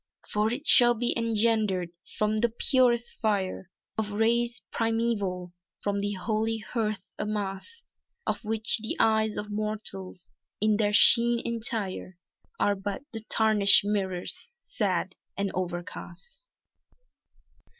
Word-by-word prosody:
"For 210 +1 0
it 275 +5 -4
shall 240 -5 +7
be 240 +1 0
engendered 220 -5 +1 0.3
from 215 0 +1
the 235 +2 +2
purest 240 0 +1
fire 195 -3 -1 0.3
Of 215 -1 -1
rays 235 +3 +1
primeval, 220 -6 -1 0.3
from 200 0 -1
the 205 +1 -2
holy 220 +3 -1
hearth 215 -3 -3
amassed, 210 - -5 0.3
Of - - -2
which 220 +1 +1
the 220 - -3
eyes 220 -1 +2
of 210 0 -5
Mortals, 205 -4 -4 0.3
in 215 0 +2
their 205 -1 +1
sheen 235 +2 +6
entire, 220 -6 -3 0.4
Are 205 - +3
but 195 +4 -5
the 225 - -4
tarnished 210 -3 +5
mirrors, 195 - -2
sad - - -2 0.2
and 200 -1 -1
overcast!" 180 - -7
215 Hz, 120 wpm, -27 LUFS, 200-230 Hz, 0.4 s, shall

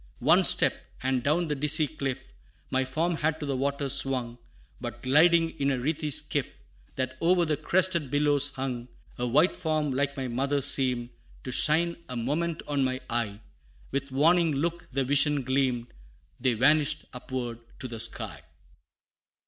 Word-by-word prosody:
One - - +4
step, - - +4 0.2
and 130 -1 0
down 155 +6 0
the 150 - -1
dizzy 150 +2 +3
cliff, 135 -3 -4 0.5
My 130 0 +1
form 160 +6 -1
had 155 0 -1
to 150 - -4
the 140 -2 -2
waters 140 0 -1
swung, 125 -3 0 0.4
But - - -7
gliding 165 +5 +4
in 140 0 +1
a 135 - 0
wreathy 150 +4 -2
skiff, - - 0 0.5
That 130 0 -4
o'er 175 +1 +3
the 155 -1 0
crested 170 0 +1
billows 145 0 +3
hung, 125 -2 -4 0.3
A 125 - -1
white 150 +9 +3
form 155 -4 -1
like 140 +1 -1
my 130 -1 -3
mother 135 +4 -1
seemed 125 -3 +1 0.3
To 130 - -5
shine 170 +6 +3
a 125 - -5
moment 155 +8 -2
on 145 -2 0
my 130 0 -1
eye; 110 -3 -2 0.5
With 140 0 -3
warning 165 +4 +3
look 170 +4 -3
the 135 +1 0
vision 145 +1 +3
gleamed, 130 -2 -1 0.5
Then 125 -4 +1
vanished 150 +4 +2
upward 125 -2 -5 0.2
to 130 - -5
the 115 -2 -7
sky! 115 - -2
140 Hz, 160 wpm, -27 LUFS, 130-155 Hz, 0.5 s, One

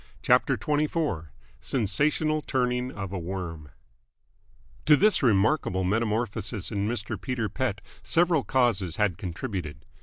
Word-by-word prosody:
CHAPTER - - +3
XXIV 150 - -1 0.3
SENSATIONAL 150 +7 +1
TURNING 125 -2 -1
OF 100 -4 -6
A 95 - -2
WORM 85 -4 -5 1.2
To 150 - +8
this 210 +7 +3
remarkable 105 -4 +2
metamorphosis 110 0 -1
in 100 -1 -1
Mr. 110 -2 -3
Peter 125 -4 -2
Pett 125 -7 -2 0.2
several 165 -4 +2
causes 105 -8 +1
had 95 -4 0
contributed. 90 - -5
110 Hz, 115 wpm, -27 LUFS, 95-135 Hz, 1.2 s, To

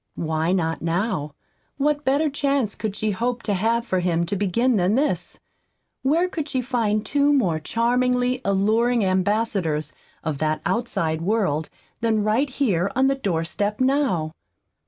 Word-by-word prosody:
Why 160 +1 -1
not 165 -3 0
now? 165 -3 -1 0.4
What 290 +1 +1
better 285 +3 +2
chance 280 -6 0
could 210 -2 -4
she 215 0 -1
hope 235 +4 -2
to 205 - 0
have 230 +4 +1
for 185 -6 0
him 170 -1 +1
to 185 - -2
begin 215 +6 +1
than 185 +3 +2
this? 290 +3 -1 0.6
Where 320 +7 +2
could 315 -4 -4
she 260 - 0
find 225 -4 0
two 285 0 +2
more 190 - +2
charmingly 250 +6 +1
alluring 220 +4 +2
ambassadors 185 -4 0 0.3
of 155 -4 -3
that 155 0 0
outside 165 -9 -1
world 175 -6 0 0.3
than 220 -2 +1
right 230 +7 +1
here 200 -9 0
on 265 +1 +3
the 275 - +3
door 195 -12 -1
step 205 +5 -2
now? 255 - +1
215 Hz, 155 wpm, -23 LUFS, 180-255 Hz, 0.6 s, on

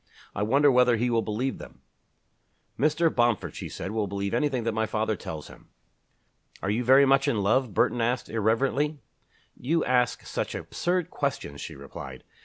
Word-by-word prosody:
I 105 - -3
wonder 140 +7 +4
whether 125 -2 +4
he 120 +2 0
will 115 -1 +2
believe 115 +5 -2
them?" - - -12 1.0
"Mr. 155 +3 +2
Bomford," 120 -3 +1
she - - -6
said, 95 - -6
"will 110 -2 -1
believe 100 +1 -3
anything 130 -1 0
that 115 - 0
my 110 0 -1
father 110 0 -1
tells 80 -5 -7
him." - - -16 0.9
"Are 95 - 0
you 115 +4 0
very 135 +3 +6
much 135 0 +3
in 105 -4 +1
love?" 115 +1 +1
Burton 120 - +2
asked, 120 +2 0
irrelevantly. 135 +7 0 0.6
"You 160 +6 0
ask 125 -1 +1
such - - -3
absurd 180 -1 -2
questions," 135 - -3
she - - -7
replied. 65 -1 -9
120 Hz, 170 wpm, -27 LUFS, 110-135 Hz, 1.0 s, very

